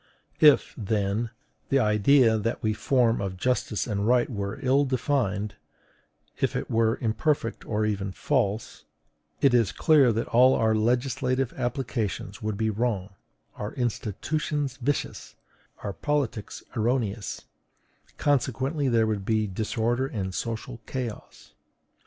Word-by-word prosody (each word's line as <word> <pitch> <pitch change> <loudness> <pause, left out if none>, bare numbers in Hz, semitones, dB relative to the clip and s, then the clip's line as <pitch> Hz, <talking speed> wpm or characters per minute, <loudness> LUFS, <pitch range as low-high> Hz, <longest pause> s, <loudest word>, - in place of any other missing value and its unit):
If, 150 -2 +6
then, 105 +1 -1 0.4
the 135 - +3
idea 110 +1 +4
that 115 +4 -2
we 110 -1 +2
form 120 -1 +2
of 95 -2 -4
justice 120 -1 0
and 105 -2 -1
right 125 0 +4
were 100 -1 -3
ill 135 +2 +4
defined, 115 -6 -1 0.8
if - - 0
it - - -3
were 115 0 +2
imperfect 115 +1 -1
or 110 -1 0
even 100 -2 -2
false, 110 -2 -1 0.6
it 140 -3 +5
is 115 -4 +3
clear 150 -7 +4
that 115 +1 -1
all 130 +2 +6
our 110 -1 +2
legislative 125 +3 0
applications 115 -6 -3
would 105 -2 -2
be 110 0 +1
wrong, 105 -3 -2 0.4
our 105 - -5
institutions 135 +4 -2
vicious, 140 +3 -3 0.5
our 100 - -3
politics 130 -8 -2
erroneous: 110 -2 -1 0.7
consequently 140 +1 0
there 115 -3 +3
would 105 -3 -1
be 110 +1 +1
disorder 115 +5 -1
and 95 -7 -4
social 115 +3 -4
chaos. 125 -5 -6
115 Hz, 125 wpm, -26 LUFS, 105-130 Hz, 0.8 s, If